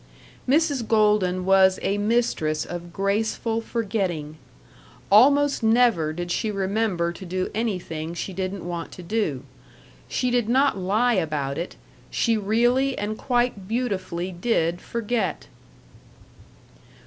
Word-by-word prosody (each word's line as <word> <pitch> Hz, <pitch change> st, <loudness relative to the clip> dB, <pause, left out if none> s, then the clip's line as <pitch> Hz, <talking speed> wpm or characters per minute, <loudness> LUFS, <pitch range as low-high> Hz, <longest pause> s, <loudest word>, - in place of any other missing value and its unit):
Mrs. 285 Hz, -5 st, +2 dB
Golden 210 Hz, -4 st, +2 dB
was 190 Hz, 0 st, +5 dB
a 200 Hz, +1 st, 0 dB
mistress 205 Hz, -9 st, 0 dB
of 175 Hz, 0 st, -7 dB
graceful 220 Hz, +4 st, -1 dB
forgetting. 190 Hz, -10 st, -3 dB, 0.7 s
Almost 280 Hz, +7 st, +5 dB
never 225 Hz, -8 st, +3 dB
did 175 Hz, +2 st, -5 dB
she 220 Hz, -, 0 dB
remember 195 Hz, -3 st, -1 dB
to 190 Hz, -, -10 dB
do 185 Hz, +1 st, -3 dB
anything 175 Hz, -7 st, -3 dB
she 190 Hz, -, -4 dB
didn't 185 Hz, 0 st, -4 dB
want 170 Hz, -1 st, -5 dB
to 180 Hz, -, -10 dB
do. 170 Hz, -, -1 dB, 0.6 s
She 250 Hz, -1 st, -1 dB
did 240 Hz, -3 st, +1 dB
not 270 Hz, +3 st, +3 dB
lie 210 Hz, +6 st, +1 dB
about 150 Hz, -6 st, -1 dB
it; 175 Hz, -, -5 dB, 0.3 s
she 230 Hz, -2 st, +1 dB
really 240 Hz, +6 st, +2 dB
and 210 Hz, +1 st, -2 dB
quite 240 Hz, -6 st, -1 dB
beautifully 190 Hz, -6 st, -2 dB
did 175 Hz, -3 st, 0 dB
forget. 230 Hz, -5 st, -2 dB
200 Hz, 120 wpm, -24 LUFS, 175-230 Hz, 0.7 s, was